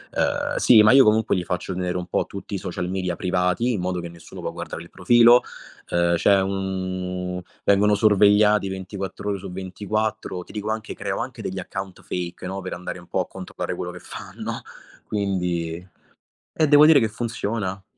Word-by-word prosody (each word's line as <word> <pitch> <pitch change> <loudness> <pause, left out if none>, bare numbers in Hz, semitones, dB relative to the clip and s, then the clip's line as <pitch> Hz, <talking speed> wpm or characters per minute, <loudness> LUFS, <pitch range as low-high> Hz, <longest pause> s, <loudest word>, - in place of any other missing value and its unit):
uhm, - - 0
sì, 110 -3 +7
ma 110 - +7
io 135 -1 +8
comunque 110 -1 +3
gli 90 - -1
faccio 90 +1 -3
tenere 90 0 -2
un 90 - -4
po' - - 0
tutti - - -8
i - - 0
social 90 - -4
media 90 -2 -2
privati, 90 +6 +1
in 100 - -2
modo 90 0 -2
che 85 - -5
nessuno 85 0 -12
può - - -3
guardare 85 - -6
il 85 - -15
profilo. 120 +6 +6 0.5
Uhm, 85 0 +2
c'è 100 +3 +4
un 95 -1 -3 0.2
vengono 105 +1 +4
sorvegliati 105 -1 +4
24 95 +1 -6
ore 100 -1 0
su 95 -1 -8
24, 100 +1 -3
ti - - -15
dico 105 0 -4
anche 110 0 -3
creo - - -3
anche - - -5
degli 95 0 -4
account 95 +1 -6
fake, 90 0 -5
no, 95 +1 -4
per 95 - -6
andare 90 0 -6
un 90 - -15
po' - - -1
a - - -5
controllare 95 -1 -5
quello - - -4
che - - -10
fanno. - - -7 0.4
Quindi 90 -4 -2 0.7
e 155 - +3
devo 145 0 +8
dire 155 -3 +7
che 110 - +1
funziona. 105 -4 -3
95 Hz, 185 wpm, -23 LUFS, 90-105 Hz, 0.7 s, io